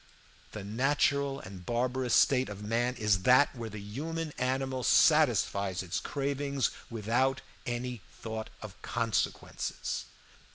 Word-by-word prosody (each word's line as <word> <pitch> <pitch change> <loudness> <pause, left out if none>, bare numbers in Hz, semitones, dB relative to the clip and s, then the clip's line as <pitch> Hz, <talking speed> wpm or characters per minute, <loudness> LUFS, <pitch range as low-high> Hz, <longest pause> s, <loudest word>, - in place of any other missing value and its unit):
The 105 - -6
natural 140 +5 +1
and 95 -1 -10
barbarous 125 +4 0
state 130 -3 +4
of 100 0 -7
man 120 +4 0
is 105 -4 +2
that 130 +7 +5
where 115 -2 -5
the 105 0 -7
human 150 +10 -4
animal 130 0 0
satisfies 100 - +4
its 95 +1 -2
cravings 140 -1 -1 0.2
without 120 +4 +1 0.3
any 120 -1 -3 0.2
thought 110 -1 -5
of 105 -1 -10
consequences. 115 -1 -2
120 Hz, 120 wpm, -30 LUFS, 105-135 Hz, 0.3 s, that